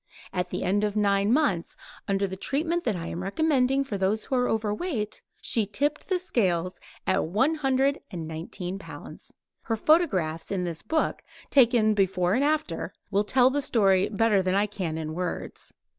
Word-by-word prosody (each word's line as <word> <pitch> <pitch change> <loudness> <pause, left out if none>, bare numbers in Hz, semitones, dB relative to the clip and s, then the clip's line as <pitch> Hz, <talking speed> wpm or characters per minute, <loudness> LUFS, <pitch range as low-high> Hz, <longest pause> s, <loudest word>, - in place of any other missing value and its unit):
At 180 -1 -1
the - - -3
end 200 +3 +1
of 210 -1 -1
nine 200 0 +2
months, 255 - +1 0.3
under 195 0 +1
the 190 -1 -5
treatment 320 - -1
I 180 -7 -1
am 170 - -5
recommending 270 - +2
for 210 -7 -4
those 200 +3 0
who 265 - -1
are 250 0 +2
overweight, 215 - -2 0.2
she 220 -3 +1
tipped 290 - -2
the 375 - +2
scales 185 - 0 0.3
at 190 - +1
one 220 - +2
hundred 275 -1 +1
and 170 -5 -6
nineteen 175 +4 -5
pounds. - - -11 0.3
Her 225 - -2
photographs, 195 - +2
in 190 -2 -1
this 170 -2 -4
book, 315 -1 -1 0.3
taken 235 -5 +5
"before 185 -3 +1
and 255 +5 +2
after," 310 +1 -1 0.2
will 200 +1 +2
tell 255 +4 +4
the 290 +1 0
story 195 -7 +3
better 210 -1 +2
than 185 0 0
I 200 +1 +3
can 185 -6 -4
in 155 -1 -4
words. 180 +1 -5
210 Hz, 175 wpm, -26 LUFS, 185-265 Hz, 0.3 s, taken